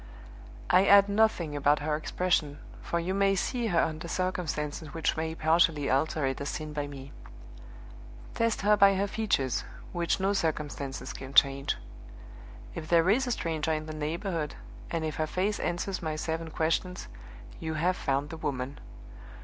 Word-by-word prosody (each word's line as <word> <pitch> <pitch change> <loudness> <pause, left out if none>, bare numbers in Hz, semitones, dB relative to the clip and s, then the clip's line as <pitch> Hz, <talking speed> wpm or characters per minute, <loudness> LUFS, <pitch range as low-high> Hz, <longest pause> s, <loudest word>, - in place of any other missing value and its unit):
"I 195 +2 +5
add 200 0 +8
nothing 200 -7 +2
about 145 +1 +3
her 150 +1 -1
expression, 155 -2 0 0.2
for 170 - -1
you 175 +3 -2
may 195 0 +3
see 235 +5 -1
her 175 -5 +2
under 160 +1 -1
circumstances 160 -4 -3
which 165 - 0
may 160 0 -2
partially 160 -3 +3
alter 140 +2 +1
it 135 0 -2
as 140 - -2
seen 155 -1 -5
by 145 -1 -2
me. 140 -1 -9 1.2
Test 230 -2 0
her 210 +2 +5
by 200 -1 +6
her 195 +1 +1
features, 200 - 0 0.3
which 175 0 0
no 195 +1 +1
circumstances 150 -6 -3
can 135 +1 -9
change. 140 0 +4 1.0
If 155 - -6
there 170 +2 +5
is 260 +5 +2
a - - 0
stranger 160 -6 -1
in 155 0 -2
the 155 - -6
neighborhood, 160 +1 -3 0.3
and 165 -1 -2
if 155 - -4
her 155 - 0
face 195 +5 -1
answers 180 +2 -2
my 155 -2 -2
seven 160 +1 -3
questions, 165 - -1 0.5
you 160 -1 -3
have 175 +4 +1
found 140 -1 -1
the 165 - -6
woman! 135 -2 -3
160 Hz, 165 wpm, -29 LUFS, 150-185 Hz, 1.2 s, add